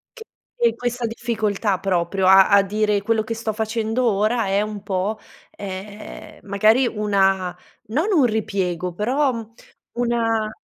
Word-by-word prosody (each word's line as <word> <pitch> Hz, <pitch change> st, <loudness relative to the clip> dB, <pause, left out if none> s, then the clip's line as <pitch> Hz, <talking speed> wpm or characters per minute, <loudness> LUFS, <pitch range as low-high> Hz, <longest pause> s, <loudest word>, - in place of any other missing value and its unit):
Che 450 Hz, -, -10 dB, 0.4 s
e 230 Hz, -1 st, +4 dB
questa 245 Hz, 0 st, -3 dB
difficoltà 220 Hz, -4 st, -1 dB
proprio 185 Hz, 0 st, 0 dB
a 190 Hz, 0 st, +7 dB
a 200 Hz, -1 st, +6 dB
dire: 210 Hz, +1 st, 0 dB
quello 220 Hz, +1 st, +1 dB
che 230 Hz, -, -3 dB
sto 225 Hz, -1 st, -3 dB
facendo 220 Hz, +2 st, -1 dB
ora 215 Hz, +3 st, +1 dB
è 195 Hz, +1 st, +1 dB
un 210 Hz, -1 st, -5 dB
po', 195 Hz, +3 st, -2 dB, 0.3 s
ehm, 200 Hz, +1 st, -9 dB
magari 215 Hz, +5 st, +3 dB
una, 195 Hz, -4 st, +1 dB, 0.3 s
non 290 Hz, -, 0 dB
un 310 Hz, -8 st, +4 dB
ripiego, 190 Hz, -6 st, -1 dB
però, 260 Hz, -, +1 dB
mhmm, 230 Hz, -1 st, -7 dB, 0.5 s
una 225 Hz, -2 st, 0 dB
215 Hz, 140 wpm, -21 LUFS, 195-230 Hz, 0.5 s, a